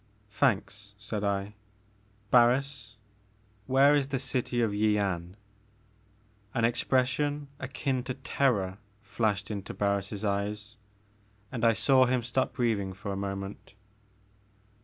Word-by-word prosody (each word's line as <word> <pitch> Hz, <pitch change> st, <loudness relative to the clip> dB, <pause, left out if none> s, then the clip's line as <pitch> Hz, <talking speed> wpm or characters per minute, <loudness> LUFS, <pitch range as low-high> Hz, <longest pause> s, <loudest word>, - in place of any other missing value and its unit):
"Thanks," 100 Hz, -4 st, 0 dB
said 105 Hz, 0 st, -4 dB
I, 100 Hz, 0 st, -1 dB, 0.8 s
"Barris, 125 Hz, -1 st, +3 dB, 0.7 s
where 135 Hz, +2 st, +5 dB
is 145 Hz, -2 st, +2 dB
the 135 Hz, -1 st, -1 dB
city 125 Hz, -1 st, -2 dB
ofYian?" 100 Hz, -5 st, +1 dB, 1.2 s
An 115 Hz, -2 st, +3 dB
expression 130 Hz, +4 st, 0 dB
akin 135 Hz, 0 st, -2 dB
to 130 Hz, -, -3 dB
terror 115 Hz, -8 st, 0 dB, 0.2 s
flashed 105 Hz, -1 st, -1 dB
into 100 Hz, -2 st, -5 dB
Bar 100 Hz, 0 st, +2 dB
ris' 100 Hz, +1 st, -6 dB
eyes 105 Hz, +1 st, -2 dB, 0.7 s
and 120 Hz, -3 st, -4 dB
I 115 Hz, -1 st, +6 dB
saw 130 Hz, +4 st, +4 dB
him 125 Hz, -1 st, +1 dB
stop 125 Hz, +2 st, -1 dB
breathing 105 Hz, -6 st, 0 dB
for 100 Hz, +2 st, -6 dB
a -, -, -3 dB
moment. 100 Hz, 0 st, -5 dB
110 Hz, 115 wpm, -29 LUFS, 100-130 Hz, 1.2 s, I